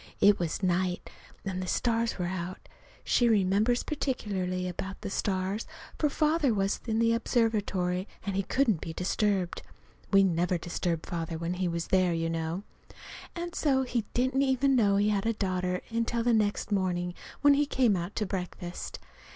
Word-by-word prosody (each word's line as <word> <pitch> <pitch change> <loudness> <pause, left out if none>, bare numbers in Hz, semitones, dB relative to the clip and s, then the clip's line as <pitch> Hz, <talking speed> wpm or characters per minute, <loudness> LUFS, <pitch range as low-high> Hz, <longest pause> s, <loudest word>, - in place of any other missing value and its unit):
It 205 0 +5
was 170 +2 -2
night 180 0 0 0.3
and 185 -1 -2
the 185 - -4
stars 230 +3 0
were 180 - -1
out. 180 0 -5 0.4
She 240 -1 +3
remembers 210 +3 +3
particularly 190 -11 -2
about 190 +2 -5
the - - -5
stars, 195 +2 -1 0.3
for 300 - +3
Father 300 -4 +2
was 195 0 0
in 220 -1 0
the 230 0 +3
observatory, 205 -6 0 0.2
and 195 -1 -2
couldn't 230 - +2
be 165 - -5
disturbed. 190 0 0 0.5
(We 195 -1 +6
never 175 -1 +1
disturb 170 -1 -2
Father 165 -1 -3
when 170 +2 -2
he's 175 -2 -1
there, 185 -2 +3
you 165 0 -1
know.) 165 +3 -2 0.7
And 345 0 -4
so 270 -3 +2
he 245 -3 -1
didn't 260 +2 +2
even 270 0 +3
know 205 -5 +4
he 205 +1 +3
had 205 0 0
a 230 - +2
daughter 180 -3 -1
until 230 0 0
the 240 0 +3
next 210 -1 +1
morning 180 -3 0 0.3
when 285 -1 +7
he 290 +1 +2
came 250 -7 +3
out 175 +2 -4
to 215 - 0
breakfast. 180 -2 -5
195 Hz, 165 wpm, -29 LUFS, 180-230 Hz, 0.7 s, when